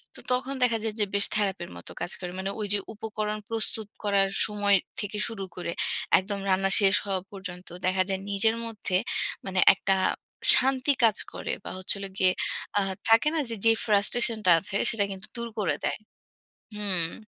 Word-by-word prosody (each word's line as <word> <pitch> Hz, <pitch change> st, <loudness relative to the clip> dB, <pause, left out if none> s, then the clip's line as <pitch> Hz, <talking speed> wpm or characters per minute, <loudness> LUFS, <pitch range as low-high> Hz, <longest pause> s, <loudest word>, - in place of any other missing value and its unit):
তো -, -, -1 dB
তখন 255 Hz, +2 st, 0 dB
দেখা 235 Hz, -2 st, +3 dB
যায় 220 Hz, -1 st, -1 dB
যে, 210 Hz, -, +3 dB
বেশ 200 Hz, -, +6 dB
থেরাপির 195 Hz, -4 st, -1 dB
মতো 85 Hz, -, -10 dB
কাজ -, -, -3 dB
করে। 180 Hz, -1 st, -6 dB
মানে 195 Hz, +1 st, -2 dB
ওইযে 205 Hz, 0 st, +1 dB, 0.2 s
উপকরণ 215 Hz, 0 st, -4 dB
প্রস্তুত 220 Hz, -1 st, -1 dB, 0.2 s
করার 200 Hz, -1 st, +2 dB, 0.2 s
সময় 205 Hz, -1 st, +2 dB, 0.2 s
থেকে 210 Hz, 0 st, -3 dB
শুরু 225 Hz, -4 st, -6 dB
করে, 175 Hz, -1 st, -4 dB, 0.5 s
একদম 200 Hz, +2 st, -4 dB
রান্না 195 Hz, +1 st, +2 dB
শেষ 195 Hz, -2 st, +4 dB
হওয়া 190 Hz, -2 st, -1 dB
পর্যন্ত 185 Hz, -2 st, -7 dB, 0.2 s
দেখা 185 Hz, 0 st, +2 dB
যায় 190 Hz, 0 st, -2 dB
নিজের 205 Hz, +3 st, +2 dB
মধ্যে 215 Hz, -5 st, -3 dB, 0.5 s
মানে 190 Hz, -1 st, -1 dB
একটা 195 Hz, 0 st, 0 dB, 0.6 s
শান্তি 265 Hz, +1 st, +3 dB
কাজ 220 Hz, -2 st, +4 dB, 0.2 s
করে -, -, -4 dB
বা, -, -, -7 dB
হচ্ছে 185 Hz, +2 st, +2 dB
হলো 195 Hz, 0 st, -6 dB
গিয়ে 185 Hz, -1 st, +4 dB, 0.5 s
আ -, -, +2 dB, 0.3 s
থাকে 225 Hz, +6 st, +5 dB
না -, -, +1 dB
যে 230 Hz, -, -1 dB
যে 225 Hz, -, +6 dB
frustration 220 Hz, +2 st, +3 dB
টা -, -, +6 dB
আছে 195 Hz, +2 st, -6 dB
সেটা 215 Hz, -3 st, +1 dB
কিন্তু 195 Hz, +2 st, -9 dB
দূর 235 Hz, 0 st, -3 dB
করে 195 Hz, -5 st, 0 dB
দেয় -, -, -2 dB, 0.8 s
হুম। 195 Hz, -1 st, -1 dB
205 Hz, 175 wpm, -26 LUFS, 190-220 Hz, 0.8 s, বেশ